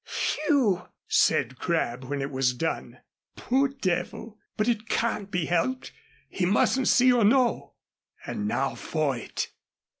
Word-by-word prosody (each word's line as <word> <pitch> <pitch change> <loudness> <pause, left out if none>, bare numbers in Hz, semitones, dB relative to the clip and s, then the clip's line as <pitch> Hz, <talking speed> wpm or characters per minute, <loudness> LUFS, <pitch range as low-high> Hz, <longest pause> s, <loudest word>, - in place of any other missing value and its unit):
"Phew!" 275 - 0 0.2
said 130 +1 +2
Crabb, 135 -7 -1
when 140 +1 -3
it 140 - -4
was 130 -2 +1
done. 165 +5 -4 0.3
"Poor 270 +3 +1
devil! 215 -3 -3 0.2
But 215 - +1
it 225 -2 -1
can't 215 -4 -1
be 180 -4 -1
helped. 175 +11 -1 0.4
He 190 - -4
mustn't 215 +7 +2
see 255 0 +5
or 240 -2 +3
know. 240 +3 +2 0.5
And 105 - -3
now 135 +5 0
for 155 -4 -1
it." 120 - -4
195 Hz, 140 wpm, -26 LUFS, -, 0.5 s, see